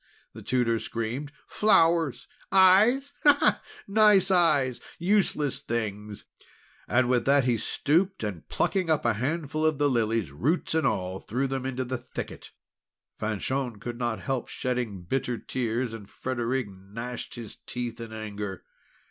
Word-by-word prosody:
the - - -10
Tutor 120 -3 +1
screamed. 120 +7 -4 0.2
"Flowers! 165 - +3 0.2
eyes? 205 +9 +5
Ha! 290 -1 +6
Ha! - - +3 0.3
Nice 200 -2 +5
eyes! 145 -9 +3 0.2
Useless 175 -7 +1
things!" 105 -3 -4 0.6
And 120 0 +3
with 125 -2 +2
that 140 0 +4
he 125 -1 +2
stooped, 170 - 0
and 100 -6 -5
plucking 185 -4 0
up 155 -5 +2
a 120 - +3
handful 150 +6 -2
of 155 -2 +2
the 145 0 +3
lilies, 115 - 0
roots 145 - 0
and 160 0 +2
all, 95 +1 -2
threw 125 +6 -2
them 135 -1 -2
into 130 -1 -3
the 130 0 -3
thicket. 125 - -7 0.7
Fanchon 110 +2 -2
could 120 +2 -6
not 120 -2 -1
help 135 -2 -2
shedding 120 -7 -3
bitter 125 +5 -1
tears, 120 0 -2
and 105 -3 -9
Frederic 130 0 -2
gnashed 105 +6 -7
his 115 -4 -8
teeth 120 -1 -4
in 115 -1 -7
anger. 105 -3 -6
125 Hz, 145 wpm, -27 LUFS, 115-155 Hz, 0.7 s, Ha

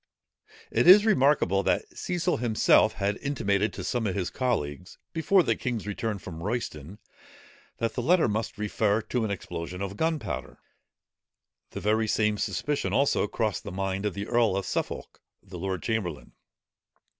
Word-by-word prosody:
It - - +2
is 205 +4 +9
remarkable 135 - +3
that - - +1
Cecil 180 0 -1
himself 110 -1 +4
had 100 0 -1
intimated 110 -7 0
to - - -6
some 120 -4 -1
of 95 - -2
his 95 -3 -2
colleagues, 90 - -2 0.2
before 180 +3 +3
the - - +1
king's 120 -5 -3
return 105 +1 -3
from 85 -3 -9
Royston, 95 - -4 0.8
that 115 - -1
the 125 - -2
letter 170 +6 +4
must 110 +1 -2
refer 105 +1 0
to 125 +1 -1
an 110 - -1
explosion 90 -2 -5
of 100 0 -4
gunpowder: 160 0 -2 1.1
the - - -7
very 110 +2 +1
same 105 -1 +1
suspicion 100 +1 -1
also 135 -3 +2
crossed 110 -1 -2
the - - -6
mind 95 +2 -2
of 100 - -4
the 100 0 -4
earl 115 -4 +2
of 100 - -2
Suffolk, - - -4 0.2
the 95 -3 -9
lord 95 0 -3
chamberlain. 90 - -3
105 Hz, 155 wpm, -27 LUFS, 95-120 Hz, 1.1 s, is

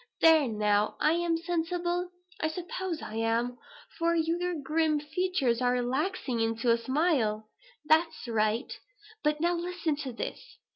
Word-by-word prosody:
There 320 -4 +6
now, 210 -1 +1
am 335 +2 +2
I - - -9
sensible? 350 +1 -1 0.3
I 315 - +1
suppose 350 +1 -4
I 220 - -6
am, 230 +2 0 0.4
for 335 0 +2
your 340 +2 0
grim 305 +1 +1
features 300 -6 0
are 245 0 +3
relaxing 255 +1 -1
into 225 +1 +1
a 230 - +4
smile. 235 -6 0 0.3
That's 320 -2 +2
right. 220 +2 0 0.5
But 300 0 +1
now 345 +1 +3
listen 345 -2 -1
to 275 -3 -4
this. 235 - -7
305 Hz, 140 wpm, -29 LUFS, 235-340 Hz, 0.5 s, There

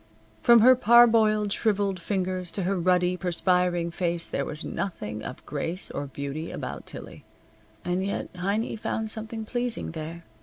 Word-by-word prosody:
From 235 -1 +7
her 255 +3 +8
parboiled, 220 -3 +5
shriveled 200 -3 0
fingers 185 -1 -2
to 195 - -1
her 195 +2 0
ruddy, 180 0 +2
perspiring 180 -1 +1
face 170 -1 -1
there - - -2
was 150 +2 -6
nothing 110 - -4
of - - -8
grace 165 +5 -4
or 145 - -4
beauty 140 +3 -5
about - - -6
Tillie. - - -9 0.6
And 180 +1 0
yet 200 - -2
Heiny 200 +6 -1
found 220 0 -2
something 220 0 -5
pleasing 240 -3 -2
there. 165 +1 -7
185 Hz, 150 wpm, -26 LUFS, 170-215 Hz, 0.6 s, her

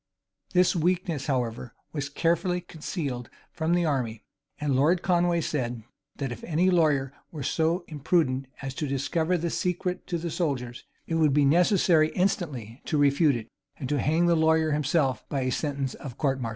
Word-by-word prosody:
This 180 +1 +4
weakness, 170 -4 0
however, 120 -3 -2 0.2
was 145 -2 -3
carefully 170 +4 +1
concealed 150 -7 -5 0.2
from 160 +2 0
the 175 -1 +2
army, 125 -7 -1 0.4
and 145 -3 0
Lord 165 +7 +3
Conway 175 -1 +2
said, 120 -7 -2 0.3
that 135 -3 -3
if 120 - -7
any 175 +3 +2
lawyer 145 -6 +2 0.2
were 150 -4 -6
so 165 +6 0
imprudent 145 -3 0 0.2
as 135 -1 -4
to 150 +2 -3
discover 160 +6 0
the 170 0 -2
secret 180 0 -2
to 175 - -1
the 170 0 -4
soldiers, 125 -9 -2 0.2
it - - -4
would 150 -3 +4
be 145 -1 +4
necessary 170 +1 +4
instantly 145 - -1
to 155 - 0
refute 145 0 +4
it, 115 -2 -5 0.3
and 130 - -5
to 145 - +1
hang 160 +6 +2
the 170 - +4
lawyer 160 0 +3
himself 145 -2 +1
by 135 -3 -1
sentence 140 0 -2
of 135 - -8
a - - -27
court 135 -3 0
martial. 115 - -2
150 Hz, 175 wpm, -27 LUFS, 135-170 Hz, 0.4 s, This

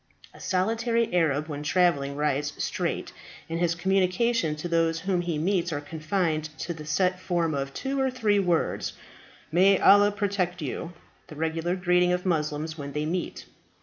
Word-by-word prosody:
A - - -15
solitary 225 +4 0
Arab 155 -3 +2
when 145 -2 -5
travelling 150 -4 +1
rides 145 0 0
straight, - - -2 0.3
and 165 0 -3
his 170 -1 +1
communications 185 -1 +1
to - - -2
those 165 -1 +1
whom 180 -1 0
he 170 -3 -2
meets 175 +1 0
are 145 - -2
confined 155 +1 -1
to 170 - -4
the 155 -2 -10
set 180 +3 +1
form 170 -3 0
of 135 -1 -2
two 270 - -3
or 265 - +2
three 220 -5 +1
words, 175 -4 0 0.6
"May 190 +4 +5
Allah 205 +2 +6
protect 195 -3 -1
you!" 165 +3 -5 0.3
the 155 - -11
regular 160 +3 -1
greeting 180 -1 +2
of 180 +1 -2
Moslems 155 -2 -1
when 140 -1 -6
they 150 +1 -1
meet. 175 +3 -3
175 Hz, 165 wpm, -26 LUFS, 155-190 Hz, 0.6 s, Allah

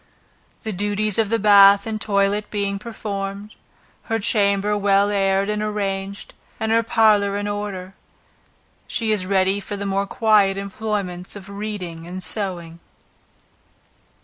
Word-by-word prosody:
The 220 - -3
duties 205 +2 -1
of 220 -2 +2
the 230 - +2
bath 200 -1 +6
and 220 -1 -4
toilet 200 0 +1
being 200 -1 -2
performed, 205 -2 -6 0.5
her 225 - 0
chamber 200 -1 +1
well 200 0 +2
aired 195 -1 +1
and 210 0 -1
arranged 200 -2 -3 0.3
and 220 0 -1
her 230 0 +4
parlor 210 -3 +3
in 205 0 -3
order, 205 -2 -5 0.9
she 225 -2 -1
is 195 -4 0
ready 190 0 +2
for 205 0 -6
the 200 - -4
more 195 0 -1
quiet 205 -3 +3
employments 200 -3 -4
of 200 -1 -10
reading 200 -5 -6
and 185 +1 -6
sewing. 175 -3 -4
200 Hz, 135 wpm, -21 LUFS, 195-210 Hz, 0.9 s, bath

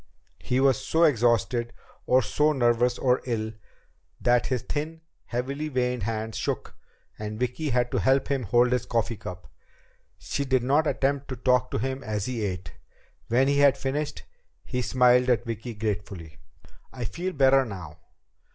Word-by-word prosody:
He 125 - 0
was 135 -3 +3
so 165 +1 +2
exhausted, 120 -4 +2 0.3
or 130 0 +4
so 150 +8 +2
nervous 120 -2 +2
or 125 -1 +2
ill, 110 -3 -2 0.7
that 120 0 +2
his 125 -3 -1
thin, 160 +2 -4 0.2
heavily 135 +5 -3
veined 125 -3 -1
hands 110 +1 -3
shook, - - -3 0.5
and 105 0 -5
Vicki 125 +5 -2
had 125 -1 +1
to - - +1
help 135 +1 +2
him 140 -2 0
hold 120 +3 +3
his 125 - 0
coffee 115 -1 -1
cup. 90 -1 -9 0.6
She 140 - -3
did 130 -2 +1
not 145 +5 +2
attempt 140 0 0
to 130 - -4
talk 125 0 +2
to - - -2
him 130 +4 -3
as 105 -3 -2
he 125 -4 -3
ate. 90 -2 -4 0.5
When 125 +4 +3
he 140 0 +2
had 140 -1 +5
finished, 145 +3 -3 0.4
he 125 - -2
smiled 125 0 +4
at 120 -1 +2
Vicki 115 +1 -5
gratefully. 100 -6 -4 0.5
"I 125 -2 -5
feel 180 - -3
better 135 -2 +5
now." 90 -10 -8
125 Hz, 160 wpm, -26 LUFS, 115-135 Hz, 0.7 s, had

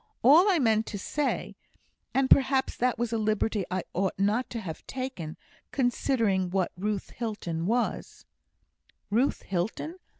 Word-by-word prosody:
All 320 - +7
I 370 - +4
meant 225 -5 +2
to 205 - -4
say 290 +9 -2 0.6
and 270 0 +2
perhaps 265 0 +4
that 250 0 +1
was 235 0 -1
a 225 - +1
liberty 215 -2 0
I 185 -1 -1
ought 190 +1 -1
not 210 +6 +1
to 235 - -4
have 170 -7 -7
taken, 255 -12 -5 0.3
considering 230 -7 +1
what 185 -1 0
Ruth 200 +2 -3
Hilton 185 -8 -3
was 240 +3 -1 0.4
" - - -40
"Ruth 245 +7 +1
Hilton!" 215 - -3
225 Hz, 145 wpm, -28 LUFS, 190-260 Hz, 0.6 s, All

